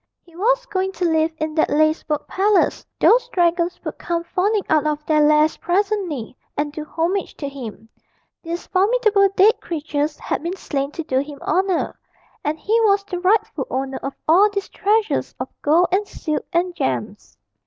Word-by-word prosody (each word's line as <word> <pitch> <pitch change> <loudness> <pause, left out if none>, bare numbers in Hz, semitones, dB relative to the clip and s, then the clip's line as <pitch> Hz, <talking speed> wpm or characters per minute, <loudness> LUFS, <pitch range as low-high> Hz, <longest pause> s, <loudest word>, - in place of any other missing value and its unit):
He 340 -2 -21
was - - +1
going 385 -4 -2
to 360 - -2
live 320 -1 +2
in 310 0 -3
that 315 - +2
lacework 310 0 +1
palace; 400 +1 +2 0.2
those 480 +1 +4
dragons 345 -3 +1
would - - -6
come 340 -1 -2
fawning 395 +4 0
out 310 -1 +2
of 300 0 -2
their 305 -1 +3
lairs 300 +1 +4
presently, 360 - -1 0.2
and 295 0 -1
do 310 - -5
homage 335 +5 -2
to 285 - -4
him; 235 -6 -8 0.5
these 335 +1 -5
formidable 405 0 +3
dead 430 +5 +5
creatures 300 -2 -2
had - - -3
been 345 +4 -4
slain 275 -5 -2
to 330 - -4
do 260 -4 0
him 285 +1 -5
honour; 370 +1 0 0.4
and 300 +1 -1
he 445 +8 +1
was 400 -2 +3
the 370 -3 -5
rightful 405 +6 +1
owner 265 - -3
of 275 - -5
all 375 +7 +6
these 400 -1 -4
treasures 430 +2 0
of - - -4
gold, 330 +5 +4
and 400 +3 +1
silk, 305 -5 -4
and 355 +1 0
gems. 125 - -4
340 Hz, 175 wpm, -21 LUFS, 300-395 Hz, 0.5 s, all